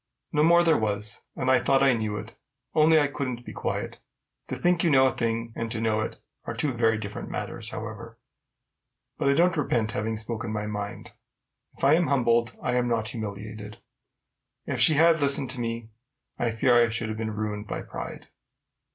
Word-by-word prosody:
No 150 - +3
more 170 +2 +6
there 165 -2 +4
was; 105 -1 -3
and 130 -1 +1
I 130 - +5
thought 135 0 +3
I 135 -1 +5
knew 110 -2 -2
it, 110 +2 -8 0.4
only 155 0 +5
I 145 - +3
couldn't 130 -4 -4
be - - -8
quiet. - - -3 0.5
To - - -3
think 175 0 +2
you 170 - +3
know 130 -3 +5
a 130 - +2
thing, 115 0 -2
and 115 0 -3
to 110 - -2
know 110 -1 +1
it, - - -5 0.3
are - - -4
two 150 - 0
very 115 -2 +2
different 105 -2 -6
matters, - - -4
however. - - -7 1.0
But 140 - +2
I - - +5
don't 175 +3 +3
repent 120 -7 0
having 110 +1 -2
spoken 110 0 -4
my 105 -1 -2
mind: 105 -1 -5 0.7
if - - -12
I 140 - +6
am 170 0 +3
humbled, 120 -4 +2
I 125 0 +1
am 125 0 +1
not 115 -2 0
humiliated. 105 0 -7 0.9
If - - -3
she 155 - +6
had 165 +2 +5
listened 140 -2 +3
to 130 - -4
me, 115 -1 -4 0.5
I 120 - +1
fear 115 +2 +3
I 115 - +1
should 115 0 -3
have 110 - -4
been 110 -1 -3
ruined 105 -1 -3
by - - -4
pride. - - -8
115 Hz, 195 wpm, -26 LUFS, 110-140 Hz, 1.0 s, more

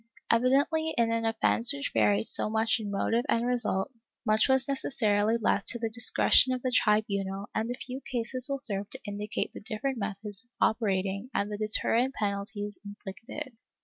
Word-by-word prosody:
^ - - -34 0.3
Evidently 280 +7 +2
in 230 -1 +2
an 230 0 -1
offence 115 - +3
which 140 0 -4
varied 105 -1 +2
so - - +6
much 220 +1 +1
in 210 -2 -5
motive 225 +4 0
and 230 +1 +1
result, 240 -2 +3 0.3
much 215 +4 +2
was 265 0 +3
necessarily 225 -5 +1
left 205 -3 0
to 235 - +3
the 225 -1 -3
discretion 240 +2 +3
of 255 - -5
the 255 - -1
tribunal 200 -3 0
and 225 +2 -2
a 245 - -3
few 255 +1 -8
cases 255 +2 -1
will 275 - -1
serve 205 -6 -1
to - - -5
indicate 205 +1 -4
the - - -9
different 230 +4 -4
methods 200 0 -6
of 240 - -39
operating 200 0 0
and 200 +1 -1
the 205 - -4
deterrent 230 +4 0
penalties 205 0 -4
inflicted. 215 +7 -9
220 Hz, 180 wpm, -28 LUFS, 200-245 Hz, 0.3 s, so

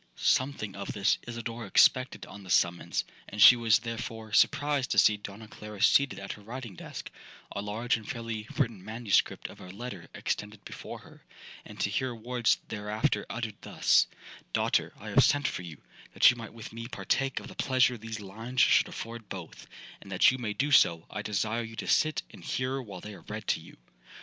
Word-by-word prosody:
'Something 130 -7 +1
of 100 0 -5
this 100 +1 +2
Isidora 115 -1 -5
expected 130 +5 +4
on 100 - -11
the 95 - -13
summons, 85 -1 +2 0.3
and 105 - -8
she 125 - +11
was, 115 -4 +4
therefore, 115 -1 -6
surprised 145 -3 +3
to - - -1
see 105 - +6
Donna 105 +1 -9
Clara 105 -1 -10
seated 140 +5 +4
at 100 0 -6
her 105 - -9
writing 115 0 -7
desk,—a 100 - -9
large 110 +4 0
and 110 - -11
fairly 115 -2 -4
written 115 -9 0
manuscript 110 0 0
of - - -13
a 90 - -10
letter 100 -3 -8
extended 105 0 -4
before - - -8
her,—and - - -15
to 100 - +1
hear 125 +2 -1
words 120 0 +1
thereafter 105 0 -1
uttered 115 -3 -5
thus: - - +3 0.5
'Daughter, - - +1
I - - -8
have - - +5
sent 145 0 +3
for - - -3
you, 85 -4 -9 0.4
that - - +8
you - - -5
might 115 -3 -8
with 115 -1 -10
me 115 0 -6
partake 125 +5 -1
of - - -10
the - - -10
pleasure 130 -1 +3
these 110 -1 -6
lines 115 +5 -3
should - - +5
afford 115 -2 -7
both; 90 -4 -8 0.3
and 95 - -12
that 90 - +6
you 130 - -4
may 110 -4 -2
do 145 +6 -1
so, 85 -11 +5
I 105 - -4
desire 110 +2 -1
you 115 -1 -7
to - - -5
sit 155 0 +2
and - - -13
hear 130 +1 -2
while 100 -7 -9
they 105 - -8
are - - -12
read 110 0 -7
to - - +2
you.' - - -15
110 Hz, 195 wpm, -29 LUFS, 105-120 Hz, 0.5 s, she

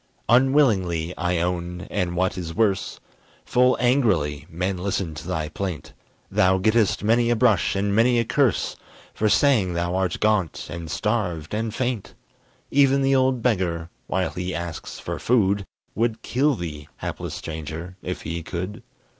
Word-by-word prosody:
Unwillingly, 105 - +3
I 90 +1 0
own, 90 0 -2
and, 90 -3 -1
what 95 +1 +1
is 85 -3 -5
worse, 100 -4 0 0.5
Full 125 +1 +3
angrily, 95 - +1
men 90 +3 -2
listen 95 -3 -2
to 75 +2 -8
thy 80 -4 -2
plaint; 85 -3 -5 0.4
Thou 95 0 +4
gettest 110 +1 +2
many 115 +2 +3
a 120 - +3
brush 110 -6 +3
and 100 +1 0
many 120 +2 +4
a 115 - +2
curse, 130 -1 +1 0.4
For 110 - +1
saying 105 -10 +3
thou 85 +1 -1
art 95 -1 0
gaunt, 105 -6 +1
and 85 -1 -6
starved, 95 -8 -1
and 110 +1 -1
faint. 120 -2 -3 0.6
Even 140 -1 +4
the 135 0 +3
old 130 -2 +2
beggar, 90 -7 0 0.2
while - - 0
he 90 0 -4
asks 85 -2 -5
for - - -5
food, 100 -5 +2 0.3
Would 115 0 -1
kill 140 +3 +2
thee, 75 -6 -6
hapless - - -5
stranger, 80 +3 -6
if 90 - -5
he 85 +2 -3
could. 90 +7 -5
95 Hz, 155 wpm, -24 LUFS, 85-115 Hz, 0.6 s, Thou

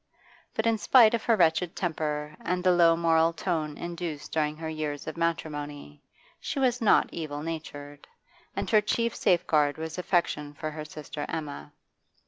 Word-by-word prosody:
But, 220 - 0
in 225 -1 +2
spite 235 0 +6
of 230 - -1
her 230 - +4
wretched 170 -1 +2
temper 155 -3 -2
and 180 0 -1
the 185 - +5
low 170 -2 +5
moral 165 0 +3
tone 160 -3 -2
induced 170 -3 -5
during 155 -1 0
her 160 0 -5
years 155 -2 -4
of 155 - -5
matrimony, 145 - -3 0.4
she - - -5
was 250 -2 +1
not 220 - +4
evil 150 -3 -5
natured, 145 -3 -7 0.5
and - - -2
her 215 -2 +6
chief 230 +2 0
safeguard 155 -5 +2
was 160 +2 -5
affection 150 -5 0
for 155 +1 -4
her 155 0 -6
sister 150 -1 -7
Emma. 145 - -5
160 Hz, 160 wpm, -28 LUFS, 150-180 Hz, 0.5 s, spite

